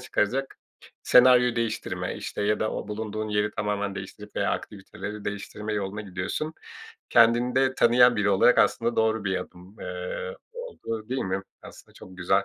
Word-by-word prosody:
çıkaracak 130 Hz, +6 st, -1 dB, 0.4 s
senaryo 125 Hz, -1 st, +6 dB
değiştirme, 115 Hz, -2 st, -2 dB
işte, -, -, -5 dB
ya 105 Hz, +1 st, +1 dB
da 110 Hz, -, 0 dB
o -, -, -5 dB
bulunduğun 110 Hz, 0 st, -4 dB
yeri 105 Hz, 0 st, +1 dB
tamamen 105 Hz, -1 st, -2 dB
değiştirip 100 Hz, +2 st, -9 dB
veya -, -, +1 dB
aktiviteleri 105 Hz, +1 st, -6 dB
değiştirme 105 Hz, +1 st, -5 dB
yoluna 100 Hz, 0 st, -3 dB
gidiyorsun. 105 Hz, -, -4 dB, 0.6 s
Kendini 120 Hz, +2 st, +4 dB
de 130 Hz, 0 st, +2 dB
tanıyan 120 Hz, 0 st, +5 dB
biri 100 Hz, 0 st, +2 dB
olarak 100 Hz, +5 st, +5 dB
aslında 115 Hz, 0 st, +2 dB
doğru 110 Hz, -1 st, +1 dB
bir 95 Hz, -1 st, 0 dB
adım, 90 Hz, +3 st, -12 dB
eee, -, -, -5 dB, 0.2 s
olduğu, 120 Hz, -, -6 dB
değil 130 Hz, +1 st, -1 dB
mi? 95 Hz, +1 st, -2 dB, 0.2 s
Aslında -, -, -14 dB
çok 95 Hz, 0 st, -13 dB
güzel. 95 Hz, +2 st, +2 dB
110 Hz, 155 wpm, -26 LUFS, 100-125 Hz, 0.6 s, senaryo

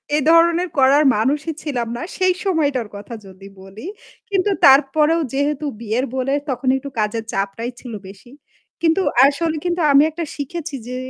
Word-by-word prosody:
এ -, -, +3 dB
ধরনের 340 Hz, +2 st, +4 dB
করার 275 Hz, +2 st, +5 dB
মানুষই 290 Hz, +9 st, -1 dB
ছিলাম 250 Hz, -6 st, -3 dB
না -, -, -6 dB, 0.2 s
সেই 370 Hz, -1 st, +2 dB
সময়টার 290 Hz, -, 0 dB
কথা 200 Hz, +3 st, -9 dB
যদি 190 Hz, 0 st, -13 dB
বলি। 195 Hz, +7 st, -12 dB, 0.4 s
কিন্তু 395 Hz, 0 st, +1 dB
তারপরেও 300 Hz, +4 st, +4 dB
যেহেতু 285 Hz, +2 st, -1 dB
বিয়ের 230 Hz, +3 st, -2 dB
বলে 260 Hz, +1 st, -1 dB, 0.2 s
তখন 255 Hz, 0 st, -3 dB
একটু 280 Hz, +1 st, -7 dB
কাজের 215 Hz, +1 st, -1 dB
চাপটাই 200 Hz, +5 st, -3 dB
ছিল 245 Hz, -3 st, -9 dB
বেশি। 195 Hz, +5 st, -14 dB, 0.5 s
কিন্তু 330 Hz, +3 st, +2 dB, 0.2 s
আসলে 315 Hz, +3 st, 0 dB
কিন্তু 350 Hz, 0 st, -1 dB
আমি 280 Hz, +1 st, +6 dB
একটা 335 Hz, +2 st, -5 dB
শিখেছি 310 Hz, +2 st, -5 dB
যে 250 Hz, -, -5 dB
280 Hz, 155 wpm, -19 LUFS, 235-325 Hz, 0.5 s, আমি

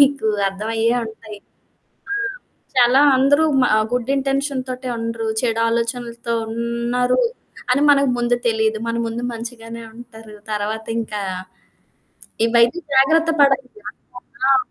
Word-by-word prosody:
మీకు 280 Hz, -4 st, +4 dB, 0.2 s
అర్థమయ్యే 225 Hz, +4 st, -1 dB
ఉంటాయి. 220 Hz, -1 st, -10 dB, 0.7 s
ఆ! -, -, +1 dB, 0.6 s
చాలా 250 Hz, +2 st, +5 dB, 0.2 s
అందరూ 285 Hz, +4 st, +4 dB, 0.2 s
మా -, -, +3 dB, 0.2 s
గుడ్ 250 Hz, +2 st, 0 dB
ఇంటెన్షన్‌‌తోటే 270 Hz, -2 st, -2 dB
ఉండరు. 230 Hz, -1 st, -3 dB
చెడు 230 Hz, -2 st, 0 dB
ఆలోచనలతో 235 Hz, 0 st, -2 dB, 0.2 s
ఉన్నారు 235 Hz, -, 0 dB, 0.5 s
అని 270 Hz, +3 st, +3 dB
మనకు 275 Hz, -2 st, +4 dB
ముందు 240 Hz, 0 st, +2 dB
తెలీదు. 220 Hz, -1 st, +1 dB
మన 230 Hz, -, -1 dB
ముందు 230 Hz, +1 st, -4 dB
మంచిగానే 230 Hz, 0 st, -8 dB
ఉంటారు. 225 Hz, -2 st, -13 dB, 0.2 s
తర్వాత 215 Hz, +1 st, -3 dB
ఇంకా 210 Hz, -2 st, -4 dB, 1.2 s
ఇవైతే 235 Hz, +6 st, +3 dB, 0.2 s
జాగ్రత్త 320 Hz, +5 st, +4 dB
పడాలి? 270 Hz, -2 st, +4 dB, 0.2 s
అనుకోకుండా 255 Hz, +1 st, -6 dB
ఆ! -, -, +6 dB
235 Hz, 115 wpm, -20 LUFS, 225-265 Hz, 1.2 s, ఆ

